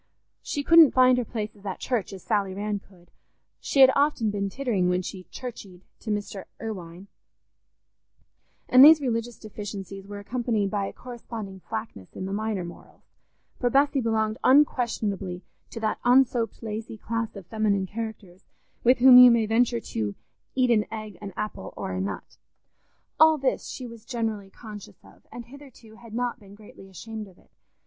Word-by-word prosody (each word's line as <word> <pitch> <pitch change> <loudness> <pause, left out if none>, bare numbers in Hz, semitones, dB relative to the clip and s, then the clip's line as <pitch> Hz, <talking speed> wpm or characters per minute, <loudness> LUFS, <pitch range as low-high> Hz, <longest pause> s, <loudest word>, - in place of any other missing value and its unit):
She 285 - -3
couldn't 330 -2 +7
find 255 -1 +5
her - - 0
places 210 -3 -6
at 195 -2 -4
church 235 -8 -2
as 190 -2 -10
Sally 200 -4 -1
Rann 205 +1 -2
could, 180 -3 -23 0.5
she 275 - +1
had 265 0 +9
often 280 -7 +2
been 200 -1 -2
tittering 210 -7 0
when 180 0 0
she 185 0 -8
"curcheyed" 205 -8 -9 0.2
to 225 - -8
Mr. 205 -2 -3
Irwine; 185 -5 -7 1.6
and 255 +1 +8
these 310 +2 +9
religious 240 -3 -2
deficiencies 195 -2 -8
were 205 0 -7
accompanied 220 -2 -2
by 200 -2 -1
a - - -6
corresponding 230 -5 -8
slackness 220 - -7
in 185 - -5
the 195 - -4
minor 215 -2 -2
morals, 175 - -13 0.6
for 245 - +1
Bessy 275 +1 +2
belonged 220 -1 0
unquestionably 215 -9 +1 0.3
to - - -7
that 215 -1 -1
unsoaped 245 -2 +2
lazy 220 0 -6
class 230 +1 -4
of 195 -3 -9
feminine 205 -1 0
characters 205 -3 -7 0.4
with 250 +2 +5
whom 250 0 +9
you 250 0 +10
may 235 -2 +3
venture 235 +2 +2
to 105 - -4 0.4
"eat 255 -2 +3
an 215 -2 +2
egg, 215 -3 -7
an 200 -1 -6
apple, 210 - -5
or - - -4
a 95 0 -2
nut." 100 0 -6 0.8
All 315 0 +7
this 265 -2 -1
she 255 - -7
was 230 -2 -11
generally 225 -5 -3
conscious 210 0 -11
of, - - -20
and 240 - -8
hitherto 245 -4 -15
had 230 -2 -11
not 245 0 -2
been 200 -1 -15
greatly 205 -2 -15
ashamed 220 +3 -8
of 185 -2 -19
it. - - -26
220 Hz, 170 wpm, -26 LUFS, 195-245 Hz, 1.6 s, you